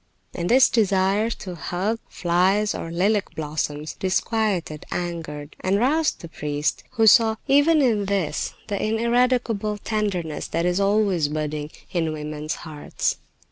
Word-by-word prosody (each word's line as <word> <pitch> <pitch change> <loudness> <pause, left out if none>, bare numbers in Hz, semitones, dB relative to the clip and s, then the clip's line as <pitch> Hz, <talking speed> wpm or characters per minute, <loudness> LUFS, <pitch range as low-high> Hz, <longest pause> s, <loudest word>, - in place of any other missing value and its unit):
And 175 0 -3
this 260 +2 +7
desire 200 -1 +2
to 190 -5 -6
"hug" 185 +6 -2
flies 190 +4 +2
or 165 - -5
lilac 190 +1 0
blossoms 150 0 -3
disquieted, 190 -4 -1
angered, 160 -4 -5
and 190 +1 +1
roused 300 +8 +1
the 170 - -7
priest, 150 -2 -2
who 225 - +3
saw, 220 +1 +6
even 290 +2 +5
in 215 -5 +2
this, 195 -4 -1
the 200 -2 -2
ineradicable 230 -1 +1
tenderness 195 -8 -2
that 170 +1 -1
is 180 +1 +1
always 200 -5 +2
budding 150 0 -3 0.2
in 165 -3 0
women's 150 +1 -4
hearts. 155 -2 -2
190 Hz, 135 wpm, -23 LUFS, 160-220 Hz, 0.2 s, this